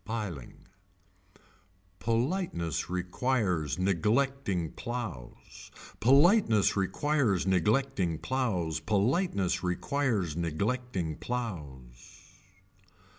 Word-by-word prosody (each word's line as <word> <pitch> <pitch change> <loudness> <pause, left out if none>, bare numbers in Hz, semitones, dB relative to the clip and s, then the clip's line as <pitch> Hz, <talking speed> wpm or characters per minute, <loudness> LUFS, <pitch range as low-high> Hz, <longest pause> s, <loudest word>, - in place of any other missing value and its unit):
Piling. 105 - -6 1.3
Politeness 115 - -1
requires 90 - 0
Neglecting 100 - 0
plows. 115 - -7 0.3
Politeness 140 - +5
requires 105 - +1
neglecting 95 -1 +1
plows. 90 -11 -1
Politeness 100 - +1
requires 95 - -1
neglecting 90 +1 -2
plows. 75 - -7
100 Hz, 60 wpm, -30 LUFS, 85-125 Hz, 1.3 s, Politeness